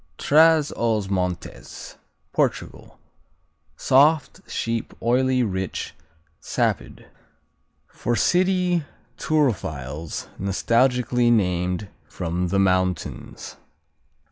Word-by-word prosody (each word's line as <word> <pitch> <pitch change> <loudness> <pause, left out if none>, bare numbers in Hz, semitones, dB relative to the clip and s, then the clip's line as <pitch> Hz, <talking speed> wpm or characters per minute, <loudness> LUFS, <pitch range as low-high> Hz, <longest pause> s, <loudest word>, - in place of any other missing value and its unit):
Traz 155 0 +4
os 110 -4 0
Montes 90 -3 -4 0.4
Portugal - - -2 0.8
Soft; 150 +6 +3
sheep; 115 -1 -3
oily; 130 +2 +2
rich; 95 -4 -3 0.5
sapid. - - -2 0.8
For 120 - -2
city 180 - +2 0.4
turophiles 80 - -2
nostalgically 120 +4 +2
named 90 -2 0 0.2
"From 90 +1 -3
the 100 - 0
Mountains." 95 -2 -1
115 Hz, 70 wpm, -23 LUFS, 90-135 Hz, 0.8 s, Traz